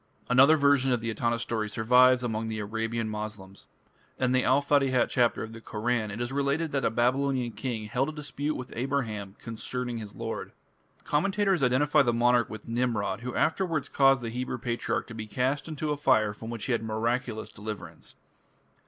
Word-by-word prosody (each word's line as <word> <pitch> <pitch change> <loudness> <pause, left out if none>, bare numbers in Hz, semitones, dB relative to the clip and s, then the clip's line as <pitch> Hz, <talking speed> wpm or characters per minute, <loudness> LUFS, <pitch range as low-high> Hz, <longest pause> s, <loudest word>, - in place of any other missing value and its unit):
" - - -33
Another 135 +5 +7
version 140 -2 +3
of 120 -2 +1
the 115 0 -2
Etana 115 +1 0
story 110 -2 -2
survives 125 +3 +4
among 110 -2 -2
the 110 -1 -3
Arabian 115 +2 -2
Moslems. 105 -3 -7 0.5
In 130 -1 +1
the 130 0 +3
"Al 130 +2 +4
Fatihat" 135 -3 +2
chapter 120 -3 +2
of 110 +1 -8
the 115 - -10
Koran 110 0 -1
it 105 +2 -6
is 120 +1 -2
related 140 +3 0
that 140 -1 -1
a - - +3
Babylonian 125 +2 +1
king 110 0 -4
held 125 +6 0
a - - -4
dispute 150 0 -4
with 125 -1 -7
Abraham 115 -6 -2
"concerning 120 +1 -4
his 105 -2 -9
Lord". 115 -1 -5 0.5
Commentators 195 +3 +1
identify 135 +4 +4
the 120 -4 +2
monarch 120 0 +3
with 110 -1 -9
Nimrod, 115 -2 -1
who 125 0 -5
afterwards 165 -2 0
caused 135 -2 +4
the 115 - -3
Hebrew 125 +1 -3
patriarch 120 -1 -2
to 115 - -10
be 110 -1 -6
cast 130 +7 -1
into 155 -1 -3
a 150 - -1
fire 110 -7 +3
from 110 +2 -9
which 115 -2 -4
he - - -2
had 115 - +1
miraculous 115 +1 -2
deliverance. 100 -6 -8
120 Hz, 190 wpm, -28 LUFS, 110-135 Hz, 0.5 s, Another